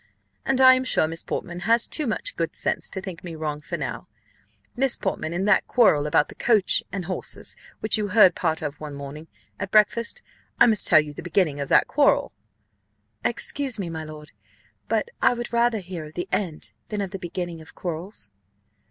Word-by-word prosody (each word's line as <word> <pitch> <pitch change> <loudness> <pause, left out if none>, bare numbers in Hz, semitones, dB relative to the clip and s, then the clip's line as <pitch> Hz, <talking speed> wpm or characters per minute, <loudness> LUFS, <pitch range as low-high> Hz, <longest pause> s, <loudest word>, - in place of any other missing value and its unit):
And 270 -1 +2
I 260 0 +9
am 255 0 +1
sure 255 -10 +3
Miss 165 +1 -5
Portman 175 -1 -5
has 230 +5 +3
too 305 -4 0
much - - -1
good - - -3
sense - - -2
to 190 - -5
think 190 -3 -8
me 170 -2 -7
wrong: 155 -2 -4
for - - -5
now, - - -5 0.7
Miss 265 0 +1
Portman, 160 - -3
in 180 +3 -1
that 205 -2 +3
quarrel 155 - +4
about 150 - +3
the - - -11
coach 215 -5 +3
and 190 -2 -4
horses, 185 0 -4 0.3
which 215 0 +2
you 210 - -1
heard 200 -2 +6
part 160 -2 -1
of 145 0 -5
one 150 -2 -6
morning 140 +3 -8 0.3
at 200 - -4
breakfast 230 - +2 0.4
I - - +8
must 220 -4 +4
tell 155 - +7
you 150 -1 -8
the - - -8
beginning 170 -4 0
of 140 - -4
that - - +5
quarrel." - - +2 0.9
"Excuse 265 +1 -1
me, 180 -5 -4
my 160 -1 -5
lord, 155 -1 -10 0.6
but - - 0
I - - +4
would 240 0 -6
rather 235 -1 +3
hear 175 -3 -7
of 150 - -13
the 175 - -3
end 155 - -2 0.2
than 210 - -4
of 195 -2 -3
the 195 - -6
beginning 175 -1 -5
of 160 - -15
quarrels." 170 - -6
185 Hz, 200 wpm, -24 LUFS, 155-220 Hz, 0.9 s, I